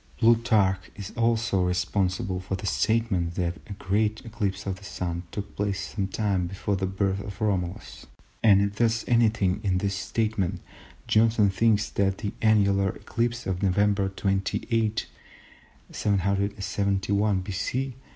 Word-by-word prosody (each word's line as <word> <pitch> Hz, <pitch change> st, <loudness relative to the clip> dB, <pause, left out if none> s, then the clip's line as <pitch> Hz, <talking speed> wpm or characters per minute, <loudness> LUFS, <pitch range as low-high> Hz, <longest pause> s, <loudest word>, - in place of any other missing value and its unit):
Plutarch 110 Hz, -5 st, +3 dB
is 100 Hz, -1 st, -7 dB
also 115 Hz, -4 st, +1 dB
responsible 90 Hz, +2 st, 0 dB
for 95 Hz, +1 st, -3 dB
the 95 Hz, -, -6 dB
statement 100 Hz, -5 st, +1 dB
that 85 Hz, -2 st, -1 dB
a -, -, -6 dB
great 105 Hz, +3 st, -1 dB
eclipse 105 Hz, -3 st, -3 dB
of 95 Hz, -1 st, -3 dB
the 100 Hz, -, -16 dB
Sun 85 Hz, -3 st, -4 dB
took 100 Hz, -1 st, -6 dB
place 100 Hz, -1 st, -1 dB
sometime 95 Hz, -2 st, -1 dB
before 95 Hz, +2 st, -2 dB
the 95 Hz, 0 st, -1 dB
birth 95 Hz, 0 st, 0 dB
of 100 Hz, 0 st, -8 dB
Romulus; 95 Hz, -2 st, -2 dB, 0.3 s
and 100 Hz, -3 st, +6 dB
if 100 Hz, 0 st, -2 dB
there 120 Hz, -, +4 dB
is 115 Hz, 0 st, -2 dB
anything 110 Hz, -5 st, +2 dB
in 95 Hz, -3 st, +1 dB
this 100 Hz, +1 st, -1 dB
statement 100 Hz, -2 st, -1 dB, 0.5 s
Johnson 110 Hz, -2 st, +3 dB
thinks 110 Hz, +1 st, +2 dB
that 95 Hz, -1 st, +1 dB
the 105 Hz, -, -4 dB
annular 100 Hz, -3 st, +3 dB
eclipse 120 Hz, +4 st, -2 dB
of 95 Hz, -1 st, -2 dB
November 100 Hz, 0 st, +2 dB
28, 105 Hz, +3 st, -1 dB, 0.9 s
771 100 Hz, 0 st, 0 dB
B. 125 Hz, +8 st, -2 dB
100 Hz, 135 wpm, -26 LUFS, 95-110 Hz, 0.9 s, and